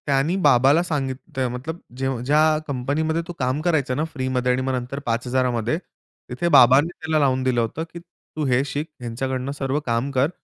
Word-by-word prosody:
त्यानी 140 +5 +2
बाबाला 140 +3 +5
सांगित 140 -6 -2 0.2
ते 130 -1 0
मतलब 130 +8 -5 0.2
जे 135 0 -1 0.2
ज्या 150 +3 +4 0.3
कंपनीमध्ये 145 +5 -1
तो 175 - -6
काम 130 +3 0
करायचं 155 -7 +1
ना 150 - +1
फ्रीमध्ये 130 -2 0
आणि 125 +1 0
मग 130 0 -1
नंतर 125 +2 -3
5000मध्ये, 120 +1 0 0.5
तिथे 130 +8 -2
बाबांनी 140 +1 +6
त्याला 160 -2 -1
लावून 130 -2 +2
दिलं 125 -2 +2
होतं, 115 +8 -3
की 170 - -7
तू 170 -3 -8
हे 130 0 +2
शिक 145 +3 -4
ह्यांच्याकडून, 130 +2 -3
सर्व 140 0 -2
काम 115 +3 0
कर 135 +2 +2
135 Hz, 180 wpm, -23 LUFS, 125-150 Hz, 0.5 s, बाबांनी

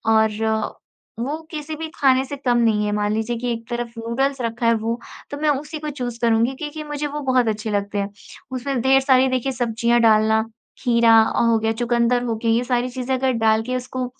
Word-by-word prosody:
और 220 0 +1 0.5
वो 275 +6 -2 0.2
किसी 310 -1 -5
भी 320 +1 -5
खाने 265 -1 +3
से 285 - -6
कम 250 -3 +1
नहीं 220 -3 +2
है। 210 - -1
मान 210 0 0
लीजिए 225 +2 -1
कि 245 +1 -2
एक 230 0 -8
तरफ 240 -1 -3
नूडल्स 265 +4 -1
रखा 230 +1 -2
है 230 - +5
वो, 230 +2 -2 0.3
तो 285 - -4
मैं 305 0 +1
उसी 295 +2 -2
को 305 0 -4
चूज़ 245 -5 -5
करुँगी 230 +2 +2
क्योंकि 305 +2 -6
मुझे 295 0 -3
वो 295 +1 -5
बहुत 250 -3 +3
अच्छे 215 0 -2
लगते 205 0 -2
हैं। 200 0 -1 0.4
उसमें 260 0 -2
ढेर 265 +2 +5
सारी 265 -1 +4
देखिए 255 +1 -1
सब्जियाँ 235 -1 +1
डालना, 220 -1 +4 0.4
खीरा 235 -2 +4 0.2
हो 230 -1 +3
गया, 225 0 0
चुकन्दर 240 +1 +1
हो 230 -2 -1
गए 230 - +1
ये 230 +2 +2
सारी 245 0 0
चीज़ें 255 +1 -3
अगर 260 0 +1
डाल 220 0 +4
के 255 +2 -3
उसको, 255 0 -3
240 Hz, 210 wpm, -21 LUFS, 225-265 Hz, 0.5 s, है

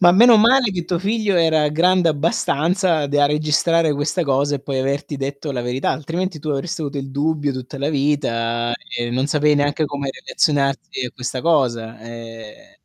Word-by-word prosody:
Ma 175 -1 +7
meno 230 +5 +7
male 235 +1 +4
che 175 -2 -3
tuo 175 -2 -1
figlio 205 0 0
era 160 -3 +3
grande 175 +3 +3
abbastanza 160 +2 +1
da 145 0 +2
registrare 155 +1 +2
questa 145 +4 -1
cosa, 140 +1 +1
e - - -8
poi 135 -1 -3
averti 140 +2 -2
detto 140 +2 -4
la 125 - -2
verità, 125 +2 -1
altrimenti 165 +2 -3
tu 155 - -6
avresti 150 +4 -3
avuto 145 -1 -4
il 135 0 -5
dubbio 145 0 0
tutta 130 +2 -7
la 140 +2 -1
vita, 120 -5 0 0.2
e 120 0 -2
non 130 +3 0
sapevi 150 0 +3
neanche 145 +2 +1
come 140 -1 -4
relazionarti 140 -2 -1
a - - -8
questa 125 0 -4
cosa. 120 -9 0
Ehm 115 - -11
145 Hz, 175 wpm, -20 LUFS, 135-165 Hz, 0.2 s, Ma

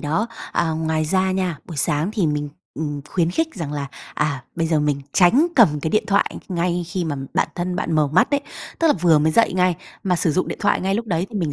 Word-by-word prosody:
đó, 160 +9 0 0.3
à, 170 -1 +1
ngoài 160 0 -1
ra 190 +4 +1
nha, 185 -5 -1
buổi 165 - -9
sáng 150 +5 +1
thì 200 -7 +1
mình, 150 -1 -1 0.3
ừm, 145 -2 -3
khuyến 170 -2 +1
khích 320 - -1
rằng 165 -7 -5
là, 145 -2 -3 0.3
à, 145 -4 -1
bây 165 -1 0
giờ 160 -2 +2
mình 145 -1 0
tránh 235 - +5
cầm 155 - +5
cái 160 - -2
điện 215 - +2
thoại 200 -2 +1
ngay 175 -1 -1
khi 175 +1 -3
mà 150 -3 -2 0.2
bản - - +2
thân 180 0 -2
bạn 170 - -2
mở 155 -1 +3
mắt 165 +6 +3
đấy, 285 -1 +2 0.4
tức 330 - +2
là 305 - +6
vừa 165 -3 +5
mới 155 +1 +2
dậy 230 - +4
ngay, 180 -1 +2 0.3
mà 180 -2 +1
sử 165 -2 +1
dụng 185 - 0
điện - - -5
thoại 205 - +2
ngay 190 +1 0
lúc 230 +2 -2
đấy 175 -2 -1
thì 215 - -3
mình 160 -5 -1
170 Hz, 250 wpm, -21 LUFS, 155-190 Hz, 0.4 s, là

